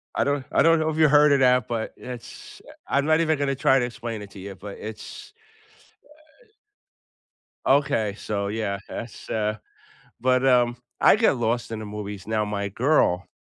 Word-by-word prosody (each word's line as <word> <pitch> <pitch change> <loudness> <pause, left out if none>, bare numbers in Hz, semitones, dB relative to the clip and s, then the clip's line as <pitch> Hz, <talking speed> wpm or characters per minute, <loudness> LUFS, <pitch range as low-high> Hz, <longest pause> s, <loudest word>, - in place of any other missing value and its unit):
I - - +2
don't 140 -2 -1
I - - +3
don't 165 0 +5
know 160 0 0
if 155 - -3
you 155 -1 +6
heard 150 +1 +5
of 140 - +3
that, 125 -3 +3
but 115 -2 -3
it's, 125 -2 -10
eh - - -12 0.2
I'm 140 +1 +1
not 155 0 +3
even 155 -2 +1
gonna 140 -1 -1
try 135 +1 +3
to 120 - 0
explain 115 -2 -6
it 100 -1 -10
to 100 - -12
you, 100 0 -8
but 100 +1 -9
it's, 110 - -9 1.1
uh 440 - -30 1.2
Okay, 140 -7 +2
so, 100 -1 -3
yeah, 100 -2 -2
that's, 115 -1 -8
uh 110 0 -1 0.6
but, 130 +1 +2
um, 120 -2 +3 0.2
I - - +6
get 220 -9 +3
lost 115 0 -1
in 110 - -4
the 110 - -6
movies. 105 -1 -7
Now, 110 -1 0
my 100 -1 -3
girl 105 - +1
120 Hz, 190 wpm, -24 LUFS, 105-140 Hz, 1.2 s, you